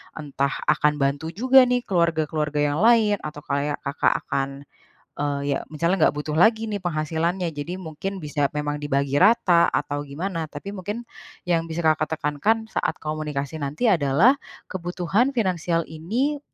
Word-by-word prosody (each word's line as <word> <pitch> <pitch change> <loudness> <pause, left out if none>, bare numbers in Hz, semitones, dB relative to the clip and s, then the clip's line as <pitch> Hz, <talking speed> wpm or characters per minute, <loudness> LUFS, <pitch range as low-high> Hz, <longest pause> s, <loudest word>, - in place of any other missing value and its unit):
entah 140 -2 -2 0.2
akan 150 0 +3
bantu 140 +3 0
juga 255 +4 +6
nih, 245 0 +1
keluarga-keluarga 160 -5 0
yang 145 - -2
lain, 220 -1 +4
atau 150 -1 -7
kayak 145 0 -2
Kakak 140 0 +1
akan, 135 0 -1 0.7
eee, 145 -1 -1
ya, - - -1
misalnya 170 +2 +2
nggak - - -2
butuh 150 +1 -3
lagi 220 +7 +4
nih, 205 - -2
penghasilannya. 165 +1 -1
Jadi, 145 +5 -5
mungkin 185 +3 -5
bisa 145 -3 -1
memang 150 0 -3
dibagi 140 -1 0
rata, 185 -4 +5
atau 145 0 -2
gimana, 165 +2 -4
tapi 175 +7 -7
mungkin 205 +5 -5 0.4
yang 165 -1 +1
bisa 165 +1 -3
Kakak 155 0 +1
tekankan 205 +11 0
saat - - -1
komunikasi 155 -1 -4
nanti 150 - -1
adalah, 165 - +4 0.4
kebutuhan 185 +6 0
finansial 175 -5 0
ini 235 - -2
160 Hz, 150 wpm, -24 LUFS, 150-195 Hz, 0.7 s, juga